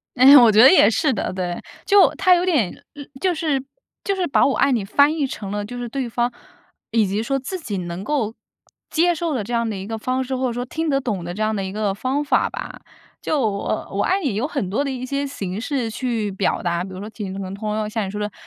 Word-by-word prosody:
哎 255 - +4
呀， 285 - +10
我 230 -2 +7
觉 215 - +6
得 265 - +9
也 370 - +6
是 290 +4 +1
的， - - -2
对。 180 -2 -3 0.2
就 405 -1 +6
他 370 -2 +4
有 355 0 +3
点 280 - +1 0.5
就 370 -1 +2
是 300 -5 -1 0.4
就 395 - 0
是 370 - 0
把 280 - +3
我 275 - +2
爱 275 - +3
你 235 -5 +1
翻 285 +9 +3
译 290 -4 0
成 200 -6 -6
了， 205 0 -2
就 245 +4 -7
是 245 -1 -4
对 255 0 -3
方， 240 +1 0 0.6
以 225 -1 +3
及 200 +2 -1
说 270 +4 -1
自 355 +8 -5
己 210 -11 -4
能 175 +1 -5
够 230 -5 -1 0.6
接 345 +2 +3
受 330 -1 -2
的 230 - -1
这 240 +4 -6
样 230 -1 0
的 215 - -3
一 190 - -6
个 225 +2 -4
方 255 +4 -1
式， 260 +1 -3
或 260 0 0
者 240 - -3
说 245 +1 -3
听 320 +5 -3
得 275 -1 +2
懂 210 -9 -3
的 175 - -5
这 210 - -6
样 215 0 0
的 195 - -2
一 190 - -4
个 205 -1 -1
方 260 +8 -1
法 290 - +2
吧。 - - -7 0.4
就 310 - 0
我 205 -4 -2
“我 200 +1 0
爱 385 +2 +1
你” 265 - 0
有 235 +7 -1
很 270 - -3
多 215 +9 0
的 280 - -2
一 255 -1 -4
些 280 +2 -2
形 200 -7 -5
式 250 -2 -2
去 225 -4 -2
表 195 +1 -1
达， 170 -1 0
比 190 - -8
如 185 - -8
说 210 +2 -7
挺 205 -4 -6
都 195 - -6
能 190 -1 -5
通 210 +1 -3
用， 215 -1 -2
像 215 -1 -2
你 190 - -5
说 210 - -5
的 210 -1 -3
235 Hz, 290 characters per minute, -21 LUFS, 205-275 Hz, 0.6 s, 呀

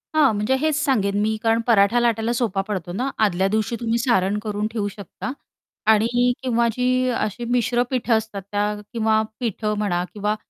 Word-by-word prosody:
हां, 305 -7 +5
म्हणजे 210 +6 +1
हेच 310 -2 +2
सांगेन, 205 -8 +1
मी 220 +1 +1
कारण 225 0 +3
पराठा 225 +1 +4
लाटायला 230 -1 +1
सोपा 220 -5 0
पडतो 185 -4 -4
ना. 255 +7 -1 0.2
आदल्या 190 0 +1
दिवशी 220 +3 0
तुम्ही 230 0 0
सारण 210 -5 +1
करून 210 0 -2
ठेऊ 210 -3 -2
शकता 200 +5 -7 0.6
आणि 240 +3 +3
किंवा 235 -2 +2
जी 255 +1 +1
अशी 230 0 -2
मिश्र 245 0 +2
पिठं 250 -2 0
असतात, 220 -3 -5
त्या 205 +1 0 0.2
किंवा 220 -1 +2 0.2
पिठं 215 -2 -2
म्हणा 180 -4 0
किंवा 210 0 -1
220 Hz, 170 wpm, -22 LUFS, 205-240 Hz, 0.6 s, हां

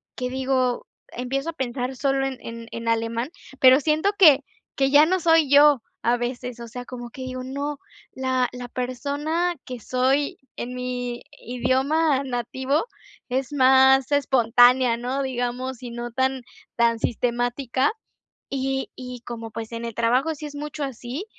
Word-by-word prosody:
que 250 0 -3
digo 260 -1 0 0.2
empiezo 270 +5 -3
a - - -4
pensar 255 -2 -3
sólo 270 0 +1
en 265 -2 -3
en 230 0 -8
en 230 0 -6
alemán, 230 +3 0 0.3
pero 260 +2 +7
siento 315 +7 +2
que 290 -7 +7 0.3
que 270 0 +2
ya 290 +2 +7
no 370 +2 +1
soy 325 -3 +4
yo, 285 -4 +6 0.2
a 240 +1 +3
veces, 245 0 -4
o 235 - -7
sea, 245 +2 -8
como 240 -2 -8
que 260 - -10
digo, 255 0 -5
no, 280 +2 -4 0.4
la 260 -1 0
la 245 0 -7
persona 290 +8 -2
que 250 -2 -6
soy 260 +5 0 0.2
en 250 +1 -5
mi 250 -1 -4 0.2
idioma 265 +4 +1
nativo 260 - -1 0.4
es 265 +2 -2
más 265 0 +5
espontánea, 250 -2 +4
¿no?, 255 +3 -2
digamos 255 0 -3
y 240 - -6
no 240 0 -5
tan 260 +1 0 0.3
tan 235 -1 +3
sistemática 245 - 0 0.6
y 270 0 -2
y 250 -1 -8
como, 230 -1 -6
pues, 225 0 -6
en 230 0 -5
el 230 - -6
trabajo 250 +7 +1
sí 300 +1 -8
es 290 - -7
mucho 295 0 -5
así, 265 - -5
255 Hz, 155 wpm, -24 LUFS, 245-275 Hz, 0.6 s, pero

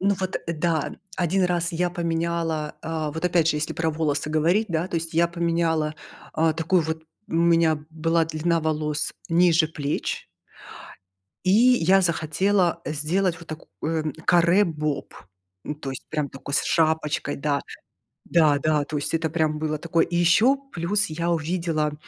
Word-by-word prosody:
Ну 200 +1 +2
вот, 185 0 -1
да, 165 -1 -1 0.2
1 185 +2 +1
раз 175 0 0
я 175 +2 0
поменяла, 165 -2 -2
а, 160 -1 -3
вот, 160 +3 -6
опять 175 -2 +3
же, 155 - +1
если 150 - -2
про 160 -1 -1
волосы 150 -2 -1
говорить, 170 +8 +2
да, 165 0 -1
то 170 - -2
есть, 165 0 -4
я 170 +1 +4
поменяла, 165 -2 0 0.4
а, 160 0 +2
такую 165 +3 +1
вот, 160 0 -4 0.3
у - - -11
меня 165 -2 +3
была 165 +1 +1
длина 165 +1 0
волос 150 -1 -1 0.2
ниже 170 -1 +4
плеч, 145 -2 -3 1.2
и 185 - +2
я 205 -4 +5
захотела 170 +1 +1
сделать 165 +5 0
вот 170 - -13
такое, 155 0 -4
м, 155 -3 -3
каре-боб, 170 -4 +2 0.5
ну, 150 - -4
то 145 -2 -6
есть, 135 - -8
прям 150 -2 -2
такое 135 +1 -8
с - - +2
шапочкой, 160 -2 0
даже. 140 0 -1 0.6
Да-да, 155 -2 +3
то 155 - -5
есть, 145 - -2
это, 165 0 +1
прям, 155 -1 0
было 155 0 -1
такое. 165 +1 +1
И 175 - -3
ещё 215 +10 +4 0.2
плюс 195 +5 0
я 165 +2 -2
увидела, 165 -2 -1
165 Hz, 160 wpm, -24 LUFS, 155-170 Hz, 1.2 s, я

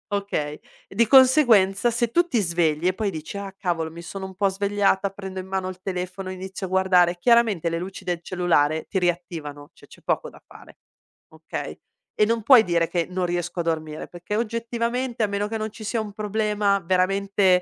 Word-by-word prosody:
okay, 150 -7 -3 0.3
di 230 +4 +2
conseguenza 240 -5 +5
se 235 0 0
tu 345 +9 +3
ti 250 -9 +1
svegli 170 -2 +1
e 185 - +2
poi 205 0 -2
dici: 160 +3 -7
"Ah, 200 -1 -6
cavolo, 170 -4 -2
mi 170 +1 -9
sono 190 +2 -7
un 190 0 -9
po' 200 +2 +2
svegliata, 200 0 +1
prendo 190 -1 -7
in 185 - -6
mano 190 -1 -2
il 185 0 -7
telefono 185 0 -4
e - - -4
inizio 190 +1 -6
a - - -11
guardare"; 180 -2 +3
chiaramente 220 -5 +3
le 165 0 -2
luci 190 +2 -8
de 175 -1 -1
cellulare 160 -4 +1
ti - - -2
riattivano, 170 -4 -3
c'è - - -19
c'è - - -17
poco - - -1
da - - -17
fare, - - -16 0.5
okay, - - -6 0.4
e - - +3
non 230 0 0
puoi 240 0 +8
dire 170 -3 +1
che 170 -1 -1
"non 180 0 -1
riesco 175 0 -3
a - - +1
dormire," 155 -2 -3
perché, 175 +4 -5
oggettivamente, 235 +1 -2
a - - +2
meno 200 +1 -2
che 225 - -2
non 215 0 -3
ci 215 +1 -11
sia 225 +2 -1
un 210 -2 -5
problema 210 -1 0
veramente 190 +1 +2
190 Hz, 200 wpm, -24 LUFS, 175-210 Hz, 0.5 s, puoi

